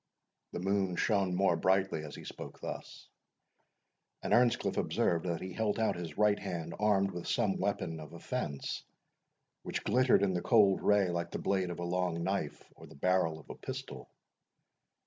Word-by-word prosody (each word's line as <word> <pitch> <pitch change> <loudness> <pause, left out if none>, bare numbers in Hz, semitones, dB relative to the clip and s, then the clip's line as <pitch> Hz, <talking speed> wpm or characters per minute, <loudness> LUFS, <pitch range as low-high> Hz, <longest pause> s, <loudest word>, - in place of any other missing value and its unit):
The - - -3
moon 95 -1 0
shone 95 -2 +1
more 95 -2 +3
brightly 95 -3 +1
as 75 - -8
he - - -9
spoke - - -8
thus, - - -7 1.2
and - - 0
Earnscliff 120 0 +3
observed 85 +1 +1
that 85 -1 -2
he 95 0 -5
held 105 0 0
out 110 -1 +1
his 85 -3 -6
right 105 -1 +4
hand 85 -4 -4
armed 100 -2 +3
with 90 -1 -6
some - - +1
weapon 80 -1 -1
of 75 -1 -9
offence, 85 - -4 0.8
which - - -4
glittered 130 -4 +4
in 95 -2 +2
the 90 - -1
cold 105 -5 +4
ray 100 -3 +3
like 85 0 -2
the - - -4
blade 95 -2 0
of 85 - -5
a 85 - -4
long 90 -1 -1
knife, 95 -5 -2
or - - -13
the - - -14
barrel 85 0 +1
of 75 - -16
a - - -7
pistol. 65 -2 -7
90 Hz, 175 wpm, -32 LUFS, 85-100 Hz, 1.2 s, right